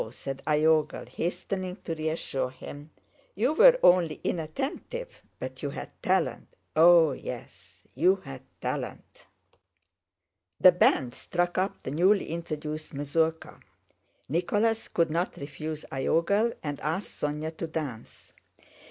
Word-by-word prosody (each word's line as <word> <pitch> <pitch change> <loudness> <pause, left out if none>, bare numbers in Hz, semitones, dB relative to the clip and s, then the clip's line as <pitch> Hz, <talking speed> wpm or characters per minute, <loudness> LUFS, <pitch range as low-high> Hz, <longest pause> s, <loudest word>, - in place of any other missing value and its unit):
said 135 +3 -7
Iogel, 155 0 +2
hastening 185 +2 -3
to 165 - -3
reassure 155 -5 -2
him. 145 +3 -10 0.5
"You 245 +9 +2
were - - +8
only 175 -3 +5
inattentive, 275 - -4 0.2
but - - -7
you - - -2
had - - -7
talent—oh 165 -1 +3
yes, 130 - -9
you 180 +8 +4
had 135 -9 -10 0.2
talent!" - - -5 1.3
The 185 - +9
band 135 -7 +3
struck 175 0 -1
up 195 +1 -2
the - - -4
newly 185 +7 +3
introduced 155 -2 -5
mazurka. 160 +3 -1 0.7
Nicholas 210 - +1
could 165 -2 +1
not 170 +3 -1
refuse 155 +2 -6
Iogel 170 - +2
and 145 -2 -4
asked 160 +8 -4
Sónya 150 +2 -2
to 165 - -3
dance. 145 -8 -6
160 Hz, 115 wpm, -28 LUFS, 150-185 Hz, 1.3 s, The